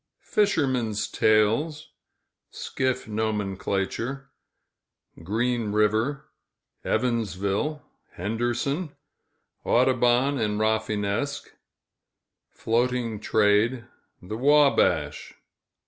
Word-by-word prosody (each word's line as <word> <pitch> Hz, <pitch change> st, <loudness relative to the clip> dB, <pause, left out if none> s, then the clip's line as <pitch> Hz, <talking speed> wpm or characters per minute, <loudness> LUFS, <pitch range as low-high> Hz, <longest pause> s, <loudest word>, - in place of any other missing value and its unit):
Fishermen's 130 Hz, -, +1 dB
tales 115 Hz, +9 st, +1 dB, 0.6 s
Skiff 130 Hz, -2 st, -3 dB
nomenclature 105 Hz, +4 st, -2 dB, 0.9 s
Green 115 Hz, +4 st, -1 dB
River 110 Hz, +6 st, 0 dB, 0.5 s
Evansville 115 Hz, -, -1 dB, 0.3 s
Henderson 120 Hz, -, -2 dB, 0.7 s
Audubon 125 Hz, +2 st, +2 dB
and 105 Hz, -1 st, -1 dB
Rafinesque 110 Hz, +4 st, -1 dB, 1.0 s
Floating 120 Hz, -1 st, -1 dB
trade 110 Hz, +4 st, +2 dB, 0.4 s
The 105 Hz, +5 st, -5 dB
Wabash. 120 Hz, -, +2 dB
115 Hz, 55 wpm, -25 LUFS, 105-130 Hz, 1.0 s, Audubon